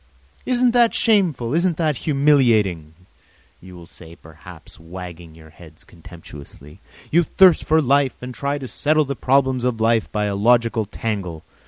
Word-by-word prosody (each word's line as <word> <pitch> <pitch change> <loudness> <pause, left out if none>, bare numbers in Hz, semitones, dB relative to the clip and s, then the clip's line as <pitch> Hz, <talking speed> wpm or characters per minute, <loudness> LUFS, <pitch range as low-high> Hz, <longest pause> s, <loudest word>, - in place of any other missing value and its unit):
"Isn't 250 -1 +2
that 235 -1 +2
shameful, 175 - +1
isn't 170 0 0
that 155 -5 -1
humiliating?" 115 - +1 0.7
you 90 0 -14
will 85 -1 -13
say, 85 -1 -15
perhaps, 80 +1 -15
wagging 85 -1 -11
your 80 -1 -17
heads 80 -1 -16
contemptuously. 80 -2 -14 0.3
"You 170 - +4
thirst 185 +1 +4
for 160 0 +2
life 140 0 +1
and 125 0 -7
try 140 +5 -3
to 135 -2 -8
settle 155 +4 0
the 140 0 -5
problems 130 -1 0
of 125 -3 -2
life 115 0 0
by 105 -1 -2
a 100 - -2
logical 115 +1 +1
tangle. 100 -6 -5
115 Hz, 155 wpm, -20 LUFS, 85-145 Hz, 0.7 s, You